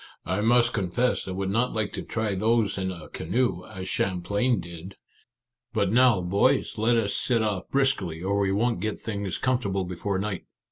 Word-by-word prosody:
" -, -, -43 dB
I 95 Hz, +3 st, 0 dB
must 120 Hz, +2 st, +4 dB
confess 105 Hz, +5 st, 0 dB
I -, -, -3 dB
would 95 Hz, +1 st, -2 dB
not 115 Hz, +4 st, +1 dB
like 110 Hz, -2 st, -1 dB
to -, -, -4 dB
try 110 Hz, -3 st, -2 dB
those 110 Hz, +1 st, +2 dB
in 95 Hz, -1 st, -2 dB
a 85 Hz, -4 st, -9 dB
canoe, 110 Hz, 0 st, -1 dB
as 95 Hz, 0 st, -7 dB
Champlain 100 Hz, +6 st, 0 dB
did! 85 Hz, +2 st, -9 dB, 0.8 s
But 100 Hz, -3 st, +1 dB
now, 120 Hz, -4 st, +5 dB
boys, 95 Hz, +4 st, +1 dB
let 115 Hz, +2 st, +3 dB
us 105 Hz, -3 st, 0 dB
set 115 Hz, -3 st, +1 dB
off 100 Hz, -3 st, -2 dB
briskly, 100 Hz, -12 st, 0 dB
or 100 Hz, +2 st, +1 dB
we 100 Hz, -1 st, +2 dB
won't 115 Hz, +2 st, +1 dB
get 110 Hz, +1 st, -2 dB
things 100 Hz, -3 st, -3 dB
com 130 Hz, -1 st, +1 dB
fortable 95 Hz, -5 st, -2 dB
before 90 Hz, +2 st, -2 dB
night." 100 Hz, -1 st, -3 dB
100 Hz, 190 wpm, -26 LUFS, 95-115 Hz, 0.8 s, now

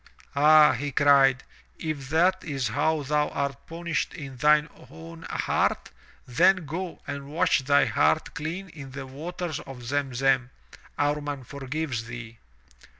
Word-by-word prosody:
"Ah,'* 150 Hz, 0 st, +7 dB
he 140 Hz, +4 st, -3 dB
cried, 135 Hz, -2 st, +4 dB, 0.3 s
'*if 150 Hz, -5 st, -5 dB
that 180 Hz, +4 st, +2 dB
is 135 Hz, -7 st, -2 dB
how 145 Hz, +4 st, 0 dB
thou 150 Hz, +1 st, +1 dB
art 140 Hz, 0 st, -4 dB
punished 170 Hz, 0 st, -3 dB
in 140 Hz, -5 st, -8 dB
thine 150 Hz, +3 st, +4 dB, 0.2 s
own 165 Hz, +2 st, -11 dB
heart, -, -, 0 dB, 0.3 s
then 180 Hz, +8 st, +3 dB
go 170 Hz, +4 st, -5 dB
and 140 Hz, -1 st, -6 dB
wash 155 Hz, 0 st, +2 dB
thy 140 Hz, +1 st, +4 dB
heart 140 Hz, +6 st, +1 dB
clean 165 Hz, +6 st, -5 dB
in 145 Hz, -5 st, -10 dB
the 135 Hz, +1 st, -7 dB
waters 160 Hz, +4 st, -5 dB
of 125 Hz, -2 st, -10 dB
Zem 135 Hz, +1 st, -2 dB
Zem. 130 Hz, -1 st, +2 dB, 0.5 s
Amman 145 Hz, -1 st, -1 dB
forgives 135 Hz, -2 st, -4 dB
thee." 115 Hz, -1 st, -9 dB
145 Hz, 140 wpm, -26 LUFS, 135-160 Hz, 0.5 s, Ah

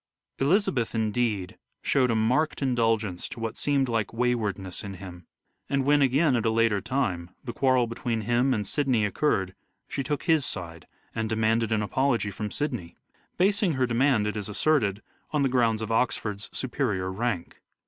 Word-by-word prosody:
Elizabeth 140 Hz, -, +1 dB
indeed 110 Hz, -3 st, -1 dB, 0.2 s
showed 130 Hz, -2 st, +2 dB
a 115 Hz, -, +2 dB
marked 130 Hz, +8 st, +1 dB
indulgence 115 Hz, -7 st, 0 dB
to -, -, -8 dB
what 115 Hz, -1 st, -3 dB
seemed 140 Hz, -2 st, +1 dB
like 115 Hz, -4 st, -1 dB
waywardness 110 Hz, -6 st, -1 dB
in 100 Hz, -1 st, -6 dB
him; 90 Hz, -3 st, -10 dB, 0.4 s
and 135 Hz, -1 st, +1 dB
when, 145 Hz, +1 st, +4 dB
again 140 Hz, +1 st, +3 dB
at 115 Hz, -, 0 dB
a 115 Hz, -, +2 dB
later 110 Hz, -3 st, +2 dB
time, 105 Hz, -8 st, -1 dB
the 120 Hz, -, -5 dB
quarrel 130 Hz, -2 st, +3 dB
between 115 Hz, 0 st, -3 dB
him 120 Hz, +4 st, +2 dB
and 105 Hz, -5 st, 0 dB
Sidney 130 Hz, -2 st, +1 dB
occurred 100 Hz, -4 st, 0 dB, 0.3 s
she 140 Hz, -, -3 dB
took 145 Hz, 0 st, -2 dB
his 160 Hz, -4 st, +3 dB
side 85 Hz, -7 st, -5 dB, 0.3 s
and 110 Hz, -1 st, -2 dB
demanded 110 Hz, 0 st, +1 dB
an 110 Hz, -1 st, +1 dB
apology 115 Hz, 0 st, 0 dB
from 105 Hz, +2 st, -4 dB
Sidney 125 Hz, -, -3 dB, 0.2 s
— -, -, -39 dB
basing 195 Hz, -1 st, +2 dB
her 130 Hz, -2 st, +1 dB
demand, 120 Hz, -2 st, +2 dB
it 105 Hz, -, -2 dB
is 105 Hz, 0 st, -3 dB
asserted, 105 Hz, -4 st, +1 dB, 0.3 s
on 150 Hz, -2 st, +2 dB
the 135 Hz, -, +2 dB
grounds 115 Hz, -3 st, +2 dB
of 110 Hz, -, -4 dB
Oxford's 105 Hz, -3 st, 0 dB
superior 105 Hz, -8 st, -2 dB
rank. 105 Hz, -3 st, -3 dB
115 Hz, 170 wpm, -27 LUFS, 105-135 Hz, 0.4 s, when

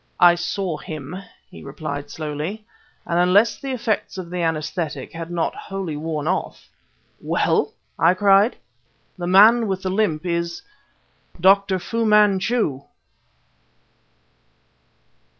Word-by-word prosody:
"I 175 Hz, -1 st, +7 dB
saw 175 Hz, -1 st, -3 dB
him!" 155 Hz, -2 st, -7 dB, 0.4 s
he -, -, -12 dB
replied 145 Hz, 0 st, -6 dB
slowly; 155 Hz, +8 st, -5 dB, 0.4 s
"and 170 Hz, 0 st, 0 dB
unless 195 Hz, +6 st, +3 dB
the 275 Hz, -, -6 dB
effects 225 Hz, -5 st, -2 dB
of 180 Hz, -2 st, -7 dB
the 180 Hz, -1 st, -3 dB
anaesthetic 155 Hz, -3 st, -3 dB
had 165 Hz, 0 st, -6 dB
not 175 Hz, -1 st, -1 dB
wholly 195 Hz, -5 st, -5 dB
worn 155 Hz, 0 st, -4 dB
off 185 Hz, +2 st, -3 dB, 0.2 s
..." -, -, -41 dB
"Well!" -, -, 0 dB, 0.3 s
I 170 Hz, +3 st, +4 dB
cried. 200 Hz, +4 st, +4 dB, 0.6 s
"The 175 Hz, -, -3 dB
man 220 Hz, +5 st, +6 dB
with 190 Hz, -1 st, -3 dB
the 185 Hz, -, -1 dB
limp 185 Hz, -6 st, 0 dB
is 170 Hz, -, -2 dB, 0.8 s
_Dr. 195 Hz, +1 st, +4 dB
Fu 230 Hz, +6 st, -2 dB
Manchu! 210 Hz, -, +2 dB
180 Hz, 120 wpm, -22 LUFS, 160-200 Hz, 0.8 s, I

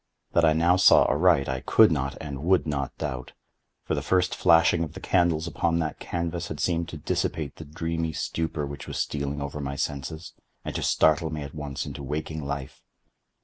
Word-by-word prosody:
That 85 Hz, -, +3 dB
I 80 Hz, -, +5 dB
now 85 Hz, +3 st, +3 dB
saw 95 Hz, -, +7 dB
aright 80 Hz, -3 st, +3 dB
I 65 Hz, 0 st, -2 dB
could -, -, +5 dB
not -, -, -1 dB
and 70 Hz, -2 st, -6 dB
would 90 Hz, +2 st, +3 dB
not 70 Hz, -3 st, -3 dB
doubt; 65 Hz, -1 st, -5 dB, 0.5 s
for -, -, -2 dB
the -, -, 0 dB
first 90 Hz, -1 st, +1 dB
flashing 85 Hz, -1 st, +4 dB
of 80 Hz, -, -6 dB
the -, -, -8 dB
candles 85 Hz, -3 st, +2 dB
upon 85 Hz, 0 st, 0 dB
that 80 Hz, -2 st, -2 dB
canvas 85 Hz, 0 st, -3 dB
had 75 Hz, -, -6 dB
seemed 85 Hz, -1 st, 0 dB
to 80 Hz, -, -7 dB
dissipate 75 Hz, 0 st, -2 dB
the 80 Hz, -, -8 dB
dreamy 80 Hz, +2 st, -3 dB
stupor 80 Hz, -1 st, -2 dB
which 70 Hz, 0 st, -8 dB
was -, -, -5 dB
stealing 70 Hz, 0 st, -2 dB
over 70 Hz, +1 st, -5 dB
my 70 Hz, 0 st, -4 dB
senses, 75 Hz, +4 st, -4 dB, 0.3 s
and -, -, -4 dB
to -, -, -3 dB
startle 80 Hz, +1 st, +3 dB
me 75 Hz, -1 st, -4 dB
at 70 Hz, -, -9 dB
once 75 Hz, -2 st, -5 dB
into -, -, -7 dB
waking 75 Hz, +2 st, -4 dB
life. 70 Hz, -1 st, -5 dB
80 Hz, 195 wpm, -26 LUFS, 70-85 Hz, 0.5 s, saw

